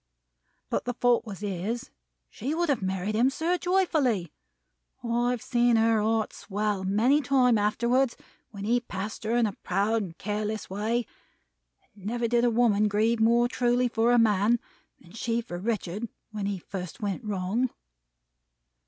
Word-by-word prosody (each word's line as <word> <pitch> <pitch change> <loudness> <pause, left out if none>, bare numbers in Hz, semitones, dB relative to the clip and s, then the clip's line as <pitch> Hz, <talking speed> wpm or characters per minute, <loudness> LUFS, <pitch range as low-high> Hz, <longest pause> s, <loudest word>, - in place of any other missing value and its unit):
But - - -1
the 245 -1 -2
fault 245 -1 +2
was 200 -2 -7
his. 205 +4 -3 0.4
She 275 +7 -3
would 345 -1 0
have 270 -6 +1
married 190 +2 -2
him, 235 +4 +3
sir, 325 +6 0
joyfully. 310 - +1 0.7
I've 240 0 0
seen 240 -1 +3
her 225 -1 +3
heart 220 0 0
swell, 205 -1 -2
many 225 +10 +3
times 250 -4 +3
afterwards, 235 +5 +1 0.3
when 200 -2 -8
he 235 +4 +2
passed 210 -2 -6
her 225 +2 +1
in 240 - +3
a 205 - -2
proud 205 +5 +1
and 170 -5 -7
careless 210 0 -3
way; 220 +4 -1 0.9
and 200 -1 -10
never 235 +1 0
did 240 +1 +2
a 245 - +4
woman 220 -3 +3
grieve 220 +3 +1
more 235 +2 +4
truly 245 0 +1
for 235 0 +2
a 245 - +5
man, 220 +1 +3 0.4
than 170 - -18
she 230 +2 -1
for 175 -7 -6
Richard 210 0 -3 0.2
when 210 -2 -3
he 200 -1 -2
first 180 0 -7
went 205 +2 -2
wrong." 210 +4 -1
225 Hz, 160 wpm, -27 LUFS, 205-240 Hz, 0.9 s, a